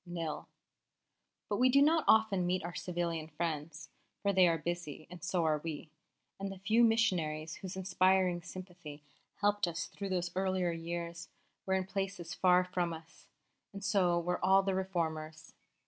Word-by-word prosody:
Nil." 165 -4 -5 1.0
But 205 - -1
we 255 +3 +5
do 275 +2 +5
not 310 +2 +4
often 210 -5 +4
meet 180 0 0
our 170 +1 -5
civilian 170 -3 -3
friends, 155 -2 -4 0.3
for 200 0 +2
they 185 -1 +6
are 165 -1 +2
busy, 160 -2 -5
and 180 -1 -10
so 180 -1 0
are 155 -1 +2
we; 155 0 -6 0.5
and 195 0 -3
the 195 - -8
few 215 +5 +3
missionaries 175 -9 +1
whose 190 -1 -7
inspiring 185 -1 +2
sympathy 175 -5 -10 0.4
helped 205 -1 +2
us 170 -1 -3
through 200 -1 -6
those 180 -1 -1
earlier 185 -2 +1
years 170 0 -5 0.4
were 190 - +2
in 190 -1 0
places 195 -2 -4
far 180 -1 +4
from 180 -2 -2
us, 160 0 -13 0.5
and 200 0 -8
so 190 -4 +2
were 180 +1 -2
all 195 +1 +5
the 195 0 0
Reformers. 160 -4 -3
180 Hz, 165 wpm, -33 LUFS, 165-190 Hz, 1.0 s, they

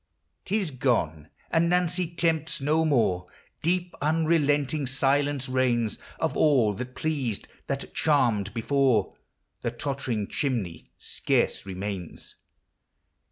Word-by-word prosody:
'T 205 - +1
is 190 -8 -2
gone! 85 - 0
— - - -32
and 170 0 +3
Nancy 180 0 +1
tempts 165 -2 0
no 155 +4 +2
more; 110 - +2 0.3
Deep, 175 +1 0
unrelenting 150 -2 +2
silence 140 +1 +1
reigns; 125 -4 +1 0.2
Of - - 0
all 130 -9 +4
that 125 +5 -6
pleased, 140 -9 -2 0.2
that 140 0 -4
charmed 120 -10 +2
before, 125 -4 +2 0.5
The - - -1
tottering 125 -3 -2
chimney 115 - -2
scarce - - -1
remains. 95 -2 -6
135 Hz, 115 wpm, -27 LUFS, 115-155 Hz, 0.5 s, all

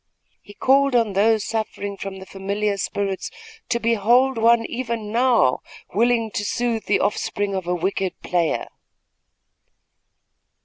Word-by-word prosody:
He 205 - -15
called 275 0 +3
on 225 -4 +2
those 215 +2 +3
suffering 215 -2 -3
from 195 -1 -7
the 190 - -10
familiar 200 +2 -2
spirits 195 0 -3 0.4
to 235 - +1
behold 235 +4 +3
one 230 0 +4
even 235 -4 -4
now 235 - +3 0.3
willing 230 +1 +2
to 205 - -2
soothe 230 +1 -1
the 205 - +2
offspring 205 0 -1
of 190 -2 -3
a 180 - +1
wicked 190 +1 -2
player. 170 -3 0
210 Hz, 130 wpm, -22 LUFS, 195-235 Hz, 0.4 s, one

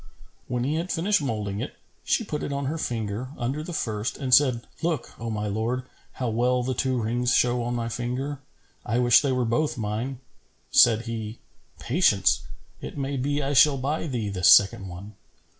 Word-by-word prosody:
When 125 -1 -1
he 145 +5 0
had 175 +3 -3
finished 190 +3 +1
moulding 105 -7 -3
it, 130 - -6 0.3
she - - +1
put 150 -8 -4
it - - -4
on 140 0 -2
her 160 +4 -2
finger, 115 -1 -3
under 130 +5 -2
the 165 - -7
first, 110 -8 -2
and 130 -3 -1
said, 125 -4 +4 0.2
"Look, 165 -6 -2
O 115 0 -4
my 105 -1 -2
lord, 110 +5 -1 0.3
how 125 -2 -2
well 125 +2 +1
the 130 +1 -1
two 130 0 0
rings 120 +3 +1
show 120 0 +2
on 120 +1 -2
my 115 -1 -2
finger! 125 +4 -3 0.4
I 115 - -1
wish 120 -1 +5
they 140 - 0
were 125 -1 +1
both 145 +7 0
mine." 115 +4 -3 0.5
Said 115 0 +6
he, 115 -1 -5 0.4
"Patience! 115 - +2 0.4
It - - -7
may 140 0 -2
be 145 +2 -1
I 140 +1 -1
shall 140 +1 +6
buy 145 +5 -2
thee 120 -7 -2
this 90 -2 +3
second 95 -1 +6
one." 95 +4 -9
125 Hz, 190 wpm, -25 LUFS, 115-140 Hz, 0.5 s, Said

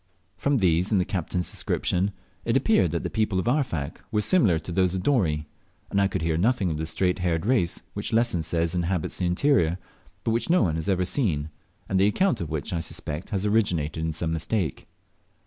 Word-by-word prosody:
From 140 -1 +1
these 90 -2 +2
and 100 - +4
the 90 - +1
captain's 90 -1 -2
description, 95 +3 0 0.3
it - - +2
appeared 90 - +3
that 85 +1 -2
the - - -2
people 110 -3 0
of 95 - -1
Arfak 120 - -1
were 105 -2 +1
similar 110 - +4
to 80 +2 -6
those 90 +1 +2
of 90 - -3
Dorey, 80 - +1 0.4
and 100 - +2
I 100 - +4
could 95 -3 -3
hear 80 -1 +1
nothing 100 -1 +2
of 75 - -2
the 80 - -2
straight 90 +3 0
haired 85 -2 0
race 110 -8 +1
which 100 +3 -3
Lesson 115 -5 +2
says 80 0 -1
inhabits 90 -1 -1
the 90 - +1
interior, 90 - +2 0.5
but 115 - 0
which 115 +8 -1
no 175 -6 +4
one 85 -5 +1
has 80 +3 -2
ever 90 -1 +2
seen, 80 - -1 0.4
and 95 - +1
the 100 - +5
account 120 - +1
of 85 - -4
which 75 +2 -3
I 85 - 0
suspect 80 0 -5
has 100 -1 -1
originated 90 -8 +1
in 80 - 0
some 80 +1 -2
mistake. 80 0 -2
90 Hz, 210 wpm, -26 LUFS, 80-105 Hz, 0.5 s, the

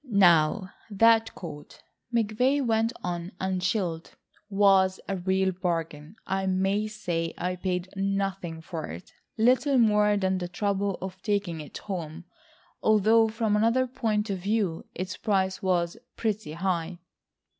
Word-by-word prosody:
"Now 185 -1 +4 0.2
that 225 +2 +4
coat," 150 -4 -10 0.3
McVay 240 +5 +1
went 225 0 +2
on 175 0 -4
unchilled, 185 -2 -2 0.3
"was 195 -2 +4
a 195 - -1
real 190 +1 +1
bargain. 165 -2 -3
I 190 0 -1
may 195 +3 +1
say 175 -6 -3
I 180 +1 -2
paid 180 0 -2
nothing 195 -4 -2
for 165 -1 -6
it,—little 250 - 0
more 210 -3 +4
than 190 -1 0
the 175 - -3
trouble 200 +1 -1
of 190 -1 -7
taking 200 -6 -1
it 150 - -9
home. 170 -4 -6 0.6
Although 220 +1 +4
from 220 -1 0
another 230 +4 +3
point 220 -4 -1
of 190 - -2
view, 195 -3 -1
its 185 0 -4
price 190 -3 0
was 180 0 0 0.2
pretty 215 -7 -2
high...." 175 0 -2
190 Hz, 130 wpm, -27 LUFS, 180-215 Hz, 0.6 s, Now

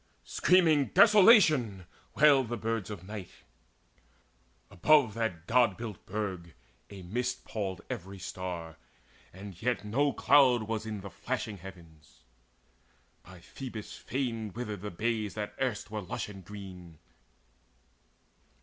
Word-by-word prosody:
Screaming 165 -6 +4
"Desolation!" 185 - +6 0.3
wailed 140 -4 +5
The 120 - -2
birds 115 -1 -3
of 100 -5 -7
night. 100 -1 -7 1.4
Above 135 - +4
that 95 -8 -3
God 120 -4 +3
built 110 -5 -8
burg 95 -5 -4 0.3
A 100 -2 -10
mist 120 +8 -3
palled 95 -4 -4
every 95 +2 -6
star; 85 -3 -6 0.5
and 95 -1 -11
yet 115 -4 -1
no 140 +7 +1
cloud 130 -6 +4
Was 110 0 -4
in 105 -2 -5
the 100 0 -9
flashing 120 0 -4
heavens. 85 -4 -14 1.0
By 90 -2 -15
Phoebus' 120 -3 -8
fane 115 -5 -3
Withered 105 -5 -5
the 105 - -5
bays 110 +2 -2
that 105 -1 -4
erst 120 -5 -2
were 105 -1 -3
lush 90 +2 -5
and 95 -2 -11
green. 90 -4 -10
105 Hz, 120 wpm, -30 LUFS, 95-125 Hz, 1.4 s, Desolation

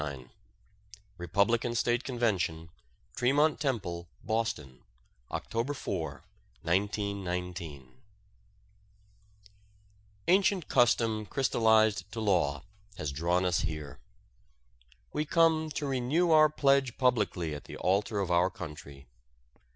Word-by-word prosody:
XXXIX 70 -5 -6 0.9
REPUBLICAN 105 +7 +1
STATE 120 +1 +1
CONVENTION, 95 -10 -1 0.5
TREMONT 145 +5 +2
TEMPLE, 90 - -3
BOSTON 110 - -2 0.5
OCTOBER 120 +6 -3
4, 80 - -4 0.4
1919 90 -7 -3 2.3
Ancient 190 -1 +3
custom 115 -4 +2
crystallized 110 -6 +2
to 115 - -5
law 85 -9 +1 0.3
has 75 - -3
drawn 85 +6 0
us 90 -2 +2
here. 75 -2 -5 1.1
We 150 - 0
come 160 0 +3
to 150 -1 -4
renew 140 +6 +1
our 155 -1 +7
pledge 140 -4 +2
publicly 105 - +1
at 75 - -8
the - - -9
altar 100 +3 0
of 90 -2 -2
our 90 +1 +3
country. 75 -6 -10
105 Hz, 95 wpm, -30 LUFS, 85-125 Hz, 2.3 s, our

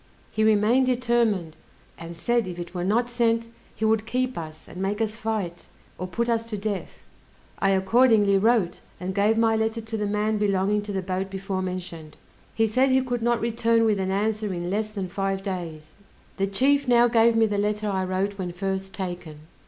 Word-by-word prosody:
He 220 - 0
remained 220 +4 +4
determined, 235 -9 +1 0.4
and 170 0 -9
said 235 +5 0
if 175 -1 -6
it 175 0 -7
were 175 -1 -3
not 225 +6 +1
sent, 230 -1 0 0.3
he 220 - -1
would 220 0 +1
keep 255 +1 -1
us, 155 -2 -8
and 180 - -8
make 200 +2 -1
us 220 -1 -1
fight, 215 -7 -4 0.3
or 185 - -3
put 230 +6 -2
us 230 -1 0
to 215 - -3
death. 200 -1 -5 0.6
I 195 - +2
accordingly 200 +1 +4
wrote, 220 -4 +2 0.2
and 185 +2 -4
gave 210 +3 +2
my 225 -1 +3
letter 220 +1 0
to 225 0 -5
the 210 -1 -1
man 210 +1 0
belonging 205 0 +1
to 205 0 -6
the 190 -1 -2
boat 190 +1 -2
before 195 0 -3
mentioned. 175 -4 -6 0.4
He 225 - +3
said 255 +5 +2
he 265 0 +4
could 245 -2 -2
not 235 0 +2
return 230 0 +2
with 210 -3 +2
an 190 0 -1
answer 210 +1 -1
in 175 0 -3
less 215 +2 0
than 200 -3 -5
five 195 +1 -2
days. 170 -6 -6 0.4
The 195 - +1
chief 275 +7 +2
now 240 -1 +5
gave 230 -1 +4
me 225 0 +4
the 205 -2 -1
letter 210 +1 -1
I 190 -2 0
wrote 190 +2 -2
when 180 -2 -3
first 195 +1 -3
taken. 175 -5 -6
210 Hz, 200 wpm, -25 LUFS, 190-225 Hz, 0.6 s, now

